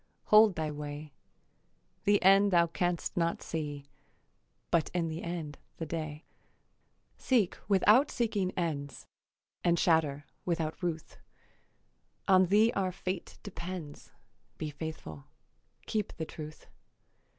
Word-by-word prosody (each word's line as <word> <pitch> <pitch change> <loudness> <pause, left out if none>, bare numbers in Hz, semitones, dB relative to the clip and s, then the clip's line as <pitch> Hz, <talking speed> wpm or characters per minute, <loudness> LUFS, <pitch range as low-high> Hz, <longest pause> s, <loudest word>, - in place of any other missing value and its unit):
Hold 210 -2 +8
thy 155 -1 -2
way. 150 0 -7 0.9
The 205 0 +5
end 195 +2 +6
thou 170 -3 +5
canst 175 +1 -2
not 170 -1 0
see, 145 -3 -4 0.9
But 165 -3 +2
in 170 -2 0
the 160 +2 -5
end 165 -4 -5 0.2
the 165 - -4
day. 155 -1 -5 0.9
Seek 230 -9 +2
without 210 +7 +5
seeking 210 -6 0
ends, 145 -6 -3 0.6
And 170 -1 +3
shatter 150 -4 +2 0.2
without 165 -2 -2
ruth; 165 -3 -4 1.1
On 185 -1 +6
thee 215 +5 +4
our 190 -2 0
fate 185 0 -5
depends; 170 -5 -7 0.5
Be 155 -1 -4
faithful, 145 - -7 0.6
keep 215 -2 -2
the 160 - -3
truth. 155 -1 -9
170 Hz, 115 wpm, -31 LUFS, 155-190 Hz, 1.1 s, Hold